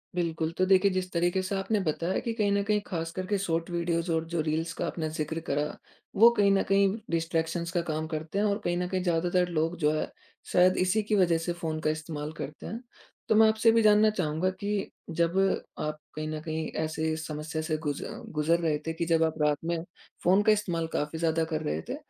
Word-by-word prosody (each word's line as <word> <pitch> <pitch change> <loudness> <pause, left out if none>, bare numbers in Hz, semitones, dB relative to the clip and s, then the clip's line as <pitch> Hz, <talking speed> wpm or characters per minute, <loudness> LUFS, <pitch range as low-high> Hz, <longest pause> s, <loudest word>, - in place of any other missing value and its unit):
बिल्कुल। 165 -2 -1
तो 185 - +3
देखिए 190 +1 +4
जिस 185 0 -2
तरीके 175 +2 +1
से 195 +1 -2
आपने 200 +2 0
बताया 170 +1 -1
कि 230 - -3
कहीं 210 -3 +1
न 200 0 +2
कहीं 210 0 +1
ख़ास 165 -3 -3
करके 190 +2 -1
शॉर्ट 165 -3 -1
वीडियोज़ 170 0 -1
और 160 0 0
जो 170 - -2
रील्स 160 +2 -1
का - - -3
आपने 160 -2 -3
ज़िक्र 155 +1 -3
करा, 145 +2 -1 0.4
वो 230 +4 +8
कहीं 200 -1 +5
न 195 0 +3
कहीं 195 0 +4 0.2
डिस्ट्रैक्शंस 165 +1 -1
का 175 -1 +1
काम 155 0 -2
करते 155 +5 -4
हैं 210 - +2
और 200 0 +1
कहीं 175 0 0
न 180 0 -1
कहीं 185 0 -1
ज़्यादातर 175 +1 +1
लोग 165 +1 0
जो 150 -1 +3
है - - -3 0.4
शायद 180 +1 +5
इसी 210 +4 +2
की 210 +1 0
वज़ह 175 -4 +4
से 170 +2 -2
फ़ोन 160 -2 -3
का 155 - 0
इस्तेमाल 155 -1 -4
करते 145 +2 -7
हैं। 230 - -5 0.5
तो 220 - +4
मैं 220 0 +7
आपसे 220 +1 +4
भी 230 0 +4
जानना 215 0 +6
चाहूँगा 180 -3 0
कि 205 -1 -2 0.3
जब 170 +2 +1 0.4
आप 150 0 -3 0.2
कहीं 155 0 -3
न 155 0 -3
कहीं 160 0 -3 0.2
ऐसे 160 0 -1
इस 160 0 -5
समस्या 155 +1 -4
से 155 0 -1
गुज़ 145 -1 -2 0.4
गुज़र 165 +3 +3
रहे 160 -3 +1
थे 165 - -1
कि 165 +1 -2
जब 165 -1 +3
आप 160 - +1
रात 150 -1 +3
में 170 0 0 0.5
फ़ोन 185 +3 +5
का 215 - +5
इस्तेमाल 175 -6 0
काफ़ी 150 +2 -2
ज़्यादा 165 0 +1
कर 155 - 0
रहे 75 +2 -2
थे, - - -2
170 Hz, 225 wpm, -28 LUFS, 160-190 Hz, 0.5 s, वो